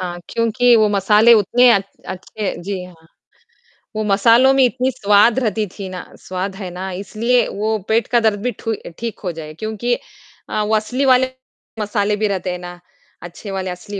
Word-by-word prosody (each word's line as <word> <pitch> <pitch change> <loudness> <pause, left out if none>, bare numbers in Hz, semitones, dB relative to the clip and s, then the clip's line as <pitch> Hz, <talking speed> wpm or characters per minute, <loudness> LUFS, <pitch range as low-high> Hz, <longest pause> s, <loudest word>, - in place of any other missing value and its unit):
हाँ, 175 -1 -5
क्योंकि 230 +1 +2
वो 215 -1 +4
मसाले 210 +3 +4
उतने 235 +4 +4
अच्छ 195 -3 +1 0.2
अच्छे 190 +2 -5
जी 190 0 -4
हाँ। 165 -3 -16 0.9
वो 215 - -1
मसालों 230 +6 +4
में 270 - +4
इतनी 255 +1 +1
स्वाद 210 +2 +3
रहती 220 -3 -1
थी 200 -2 -5
ना 180 -1 -7 0.2
स्वाद 185 +1 -5
है 190 -2 -6
ना 185 +2 -5
इसलिए 215 +6 0
वो 215 +2 -2
पेट 225 0 +2
का 240 0 +3
दर्द 220 -3 +1
भी 250 +3 -1
ठु 225 -2 -2 0.3
ठीक 230 -1 -5
हो 180 - -2
जाए 155 -2 -9
क्योंकि 220 +6 -2 0.6
अ, 215 - -1
वो 215 +1 +1
असली 245 +6 -1
वाले 260 0 +4 0.5
मसाले 205 0 0
भी 215 +1 0
रहते 190 -2 -2
हैं 180 - -5
ना, 175 0 -9 0.4
अच्छे 175 +4 -9
वाले, 190 -1 -3
असली 195 +3 -7
210 Hz, 185 wpm, -19 LUFS, 190-230 Hz, 0.9 s, वो